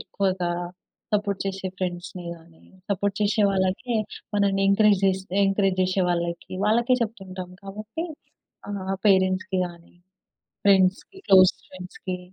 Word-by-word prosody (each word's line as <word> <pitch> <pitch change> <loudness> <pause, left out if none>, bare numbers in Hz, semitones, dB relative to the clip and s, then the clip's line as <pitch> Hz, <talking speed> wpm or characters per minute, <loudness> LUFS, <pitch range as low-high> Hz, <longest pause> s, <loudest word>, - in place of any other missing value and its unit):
ఎక్కువగా 185 -3 -1 0.6
సపోర్ట్ 200 -2 0
జెసే 190 -1 -3
ఫ్రెండ్స్‌ని 180 0 -4
గాని, 165 0 -19 0.3
సపోర్ట్ 200 +1 0
జెసే 210 +1 +2
వాళ్ళకే 195 +5 0 0.4
మనల్ని 195 -1 +2
ఎంకరేజ్ 200 0 +4
జేస్ 190 0 +2 0.2
ఎంకరేజ్ 195 -1 +1
జేసే 185 +1 +1
వాళ్ళకి, 170 0 -3
వాళ్ళకే 235 +4 +3
చెప్తుంటాం 190 -5 -6
కాబట్టి, 215 - -6 0.7
ఆహ్, 195 -1 -3
పేరెంట్స్‌కి 185 -1 +2
గాని, 170 -1 -15 0.7
ఫ్రెండ్స్‌కి, 195 - +3
క్లోజ్ 185 -1 +7
ఫ్రెండ్స్‌కి. 185 0 -7
190 Hz, 110 wpm, -25 LUFS, 185-200 Hz, 0.7 s, క్లోజ్